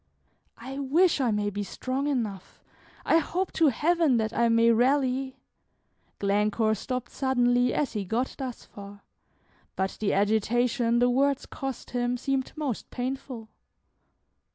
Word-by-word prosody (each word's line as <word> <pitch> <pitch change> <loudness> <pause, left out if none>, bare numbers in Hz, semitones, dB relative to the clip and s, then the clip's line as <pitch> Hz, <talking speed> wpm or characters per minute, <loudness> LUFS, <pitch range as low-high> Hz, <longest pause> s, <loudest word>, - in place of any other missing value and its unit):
"I 265 +4 -7
wish 305 +4 +3
I 250 - +2
may 210 -1 0
be 205 +1 -4
strong 260 +7 -3
enough; 215 -9 -4 0.4
I 325 - +4
hope 360 +4 -2
to 320 - +3
Heaven 310 +1 +2
that 220 0 -1
I 235 0 +2
may 230 0 +4
rally 260 +2 +1 0.4
" - - -43
Glencore 210 +2 +1
stopped 250 +3 -4
suddenly 245 -2 +2
as 285 -5 -1
he 210 -3 -2
got 230 +7 -2
thus 255 -3 -6
far, 200 0 -12 0.7
but 190 0 -2
the 215 - 0
agitation 230 +4 +1
the 245 +1 +3
words 275 +2 +1
cost 270 -2 -6
him 245 0 -1
seemed 270 +1 -2
most 290 -7 -4
painful. 250 -3 -5
245 Hz, 140 wpm, -27 LUFS, 220-270 Hz, 0.7 s, I